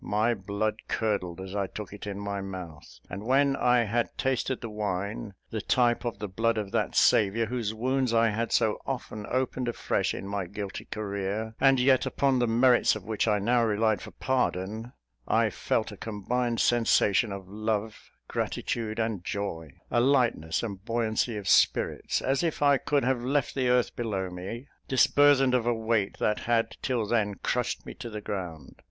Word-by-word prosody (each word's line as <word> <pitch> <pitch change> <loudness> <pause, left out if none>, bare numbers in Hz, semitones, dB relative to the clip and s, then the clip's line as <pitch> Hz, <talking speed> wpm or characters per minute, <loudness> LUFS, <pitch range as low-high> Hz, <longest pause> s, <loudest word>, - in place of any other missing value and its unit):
My 110 +3 +1
blood 105 +1 -2
curdled 100 -6 -1
as 95 +1 -7
I 100 -1 0
took 105 0 -8
it 105 0 -8
in 100 -1 -4
my 100 -1 -3
mouth; 90 -6 -8
and 95 - -6
when 135 +3 +3
I 125 -2 +3
had 115 +2 -1
tasted 130 0 0
the 115 - -6
wine, 100 0 -3 0.2
the 110 - -2
type 120 +2 +2
of 120 - -2
the 105 0 -4
blood 115 +4 0
of 105 -2 -3
that - - -1
Saviour, 105 +3 +4
whose 115 -2 -2
wounds 130 +3 0
I 115 0 +4
had 115 +2 -2
so 110 -1 +2
often 115 -6 -4
opened 130 0 -1
afresh 120 - -1
in 100 - -6
my 100 -2 -3
guilty 100 +1 -6
career, 105 +1 -3
and 135 -1 +5
yet 130 0 +4
upon 135 -2 +1
the 120 - +2
merits 120 +2 +4
of 110 - -7
which 110 +1 -1
I 105 -1 +3
now 120 +4 +2
relied 110 -2 +1
for - - -8
pardon, 115 -3 -2 0.3
I - - +2
felt - - -1
a - - -10
combined 115 +3 -2
sensation 115 -2 +3
of 95 -1 -7
love, 110 +1 -3 0.2
gratitude 110 -2 -2
and 110 -5 -1
joy 90 -6 -4 0.2
a 120 - +3
lightness 120 - +2
and 100 -4 -5
buoyancy 115 0 0
of 100 -2 -6
spirits, - - +2
as 135 +1 +1
if 165 -3 -1
I 140 -1 +5
could 145 -1 +1
have 125 -1 +1
left 135 +2 0
the 130 -2 0
earth 125 -1 +2
below 100 -6 -2
me, 100 +9 -7 0.2
disburthened 135 0 +4
of 120 -2 +1
a 120 - +2
weight 110 -3 0
that 105 - +1
had, 115 -1 0
till 120 -4 0
then, 105 -2 0
crushed 125 -1 -1
me - - -7
to 120 - -8
the 105 -1 -5
ground. 90 -8 -6
110 Hz, 185 wpm, -28 LUFS, 100-125 Hz, 0.3 s, and